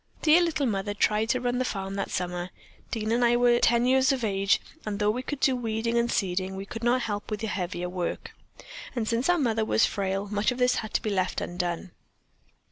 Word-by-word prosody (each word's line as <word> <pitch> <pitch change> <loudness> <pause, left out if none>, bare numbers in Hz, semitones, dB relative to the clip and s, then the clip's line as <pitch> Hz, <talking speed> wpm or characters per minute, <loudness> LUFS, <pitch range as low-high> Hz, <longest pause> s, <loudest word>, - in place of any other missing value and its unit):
"Dear 325 +2 +6
little 315 -4 0
Mother 205 -3 -1
tried 215 +1 +1
to 255 - +2
run 245 0 -1
the - - +2
farm 195 -5 -4
that 195 0 -3
summer. 180 0 -3 0.4
Dean 220 -1 -2
and 240 +1 +2
I 240 0 +4
were 240 0 +4
ten 235 +1 +3
years 260 +1 +4
of 260 -3 -1
age, 195 -2 +2 0.2
and 210 -2 -3
though 210 0 +2
we 245 +4 -3
could 285 +2 -5
do 265 -2 +3
weeding 230 -1 -2
and 235 0 +2
seeding, 190 0 -1
we 195 +1 -6
could 225 +3 -7
not 240 +1 +2
help 205 -2 -4
with 215 -1 -3
the 220 - -2
heavier 180 -3 -3
work, 180 -1 -4 0.6
and 230 -3 -1
since 235 +6 0
our 355 - +4
mother 225 -7 +1
was 220 - +3
frail 195 0 -2
much 210 +3 +1
of 250 - -4
this 250 0 +2
had 215 -1 -5
to - - +1
be 215 - -1
left 185 -2 0
undone. 175 0 -3
220 Hz, 225 wpm, -27 LUFS, 195-245 Hz, 0.6 s, Dear